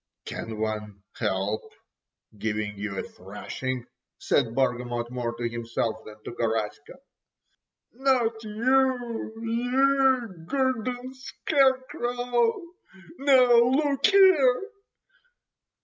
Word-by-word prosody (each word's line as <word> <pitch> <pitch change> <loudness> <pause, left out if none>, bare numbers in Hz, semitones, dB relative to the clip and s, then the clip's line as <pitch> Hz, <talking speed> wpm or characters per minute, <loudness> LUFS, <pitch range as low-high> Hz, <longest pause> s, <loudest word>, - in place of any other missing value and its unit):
"Can 110 -1 -6
one 105 -2 -4
help 100 +3 -1 0.7
giving 105 0 -3
you 100 -1 -5
a - - -2
thrashing?" 120 +6 -6 0.3
said 115 0 0
Bargamot, 120 -2 -1
more 120 -2 -3
to 120 0 -2
himself 115 -1 -3
than 105 - -10
to - - -6
Garaska. 115 +3 -3 1.0
"Not 240 -4 +1
you, 245 +1 0
you 250 -4 +1
garden 255 -1 -1
scarecrow! 255 -1 0 0.6
Now 270 -2 +6 0.2
look 275 - +2
"ere." 360 -11 +6
225 Hz, 85 wpm, -26 LUFS, -, 1.0 s, Now